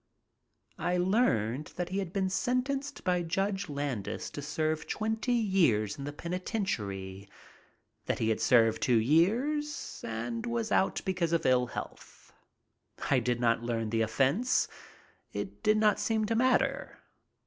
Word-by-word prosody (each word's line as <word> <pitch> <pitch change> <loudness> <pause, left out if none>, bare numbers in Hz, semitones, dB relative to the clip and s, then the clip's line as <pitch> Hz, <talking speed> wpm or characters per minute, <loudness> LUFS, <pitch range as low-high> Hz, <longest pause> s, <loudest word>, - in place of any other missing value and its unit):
I 180 0 0
learned 150 - +1
that 180 -1 -3
he 190 +2 -1
had 190 -4 -4
been 190 0 0
sentenced 265 +7 -1
by 180 -1 +1
Judge 195 +3 -1
Landis 140 -7 -3
to 145 - -6
serve 155 +1 -2
twenty 220 +3 -1
years 170 - +2
in 140 - -7
the 145 - -4
penitentiary, 110 - -4 0.8
that - - 0
he 110 - 0
had 110 - 0
served 115 -3 +4
two 120 -2 +3
years 240 - +1
and 235 0 -4
was 235 -1 -2
out 190 - +2
because 175 -3 0
of 165 -1 +1
ill 125 -1 +3
health. - - -9 0.8
I - - +5
did 120 -1 -1
not 115 -1 +2
learn 115 -2 -2
the 115 -1 +1
offense. 135 - +2 0.7
It - - -5
did 215 0 +3
not 215 -1 +3
seem 220 +1 +1
to 225 +1 0
matter. 255 +2 +1
175 Hz, 145 wpm, -30 LUFS, -, 0.8 s, I